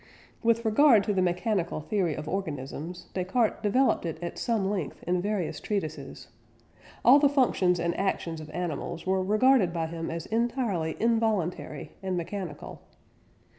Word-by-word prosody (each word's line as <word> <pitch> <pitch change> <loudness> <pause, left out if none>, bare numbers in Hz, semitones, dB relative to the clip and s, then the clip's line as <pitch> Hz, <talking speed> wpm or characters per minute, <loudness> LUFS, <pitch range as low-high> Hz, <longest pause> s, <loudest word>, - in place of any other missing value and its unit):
With 230 0 +2
regard 220 -1 +6
to 205 - 0
the 190 - +1
mechanical 180 0 0
theory 170 0 -1
of 150 0 -6
organisms, 160 -1 -5
Descartes 195 +5 0
developed 250 +6 +2
it 165 -2 -3
at 170 0 -5
some 225 -5 0
length 190 -8 -3
in 180 0 0
various 200 -4 -2
treatises. 190 -8 -4 0.8
All 270 +4 +8
the 285 -1 +5
functions 200 -10 +2
and 170 0 0
actions 170 -4 -2
of 155 - -10
animals 170 -1 -4
were 190 0 +1
regarded 215 0 +4
by 165 -1 -2
him 165 0 -5
as 165 0 -4
entirely 225 -8 -1
involuntary 220 -6 0
and 190 -2 -2
mechanical. 175 -2 -6
185 Hz, 145 wpm, -28 LUFS, 170-220 Hz, 0.8 s, All